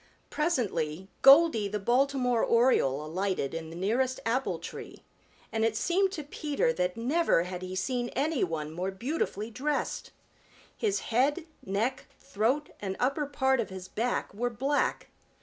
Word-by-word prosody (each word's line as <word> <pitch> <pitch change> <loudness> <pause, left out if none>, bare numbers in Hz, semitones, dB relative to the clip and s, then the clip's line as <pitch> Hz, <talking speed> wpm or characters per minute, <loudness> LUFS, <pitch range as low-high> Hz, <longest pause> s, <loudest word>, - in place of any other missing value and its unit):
Presently 190 - -1
Goldy 275 -6 +7
the 210 +1 -2
Baltimore 250 +2 +2
Oriole 190 - +3
alighted 180 -3 -2
in 165 -1 -5
the 165 - -9
nearest 245 +8 0
apple 255 +4 0
tree, - - -9 0.5
and 220 0 0
it 225 -1 +1
seemed 375 - +2
to 310 - -4
Peter 285 -3 -1
that 180 -1 -1
never 260 - +2
had 180 0 -6
he 185 0 -5
seen 240 +6 -1
any 290 +1 +1
one 155 -3 -3
more 180 +4 -3
beautifully 225 0 -3
dressed. 285 +6 -2 0.7
His 410 -3 0
head, 285 +7 +2 0.2
neck, 225 +8 -2
throat 250 +9 0
and 190 -2 -4
upper 275 +4 0
part 265 -2 +1
of 230 - -1
his 190 -1 -8
back 235 0 -2
were 240 +4 -1
black. 270 +5 -1
235 Hz, 150 wpm, -29 LUFS, 190-275 Hz, 0.7 s, Goldy